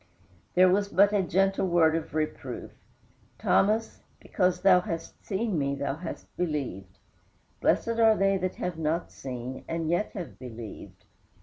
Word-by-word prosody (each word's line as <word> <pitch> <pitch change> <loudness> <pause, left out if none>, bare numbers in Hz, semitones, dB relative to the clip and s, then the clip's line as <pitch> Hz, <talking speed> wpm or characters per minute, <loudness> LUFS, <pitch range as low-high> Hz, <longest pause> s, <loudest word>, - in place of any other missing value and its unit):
There 185 +1 +7
was 200 +2 +2
but 200 +2 +4
a 205 - +3
gentle 195 +2 +1
word 165 -2 +4
of 165 -1 -4
reproof: 155 -1 -3 0.7
"Thomas, 215 +3 +1 0.2
because 180 -1 0
thou 195 -1 +6
hast 165 -2 -6
seen 200 -3 -1
me 140 0 0
thou 140 0 -3
hast 170 +1 -8
believed; 125 - -3 0.6
blessed 230 0 +1
are 220 -1 +6
they 195 0 +3
that 185 0 -2
have 175 -2 -4
not 160 +2 -1
seen 130 0 -6
and 165 -1 -2
yet 175 +5 0
have 180 -5 -7
believed." 115 -4 -9
175 Hz, 145 wpm, -28 LUFS, 150-195 Hz, 0.7 s, There